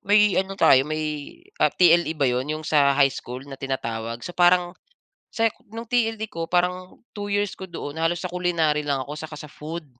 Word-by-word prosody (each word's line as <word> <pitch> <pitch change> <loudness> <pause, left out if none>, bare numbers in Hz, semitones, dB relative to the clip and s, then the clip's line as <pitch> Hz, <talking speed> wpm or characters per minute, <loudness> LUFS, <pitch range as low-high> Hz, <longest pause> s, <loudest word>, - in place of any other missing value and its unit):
may 210 0 +4
ano 195 0 -6
tayo 130 -9 +6
may, 155 -2 -4 0.2
ah, - - +5
TLE 170 -2 +3
ba 145 - +1
'yon, 125 +2 0
'yong 155 +1 -3
sa 140 -3 +3
high 135 -2 +4
school 125 +2 -7
na 135 -1 -10
tinatawag. 115 -3 -4
So 175 - -6
parang 175 0 +3 0.6
sa 225 - 0 0.2
no'ng 225 +2 -7
TLE 225 -2 0
ko 165 -6 -6
parang 180 +1 -1 0.2
2 205 -1 -5
years 205 0 0
ko 190 -1 -9
doon 160 -2 -6
halos 165 +1 +1
sa 180 - -5
culinary 165 -4 +1
lang 140 -3 -2
ako 145 - -7
saka 150 0 -8
sa - - -8
food. 155 +3 -8
165 Hz, 200 wpm, -24 LUFS, 145-180 Hz, 0.6 s, tayo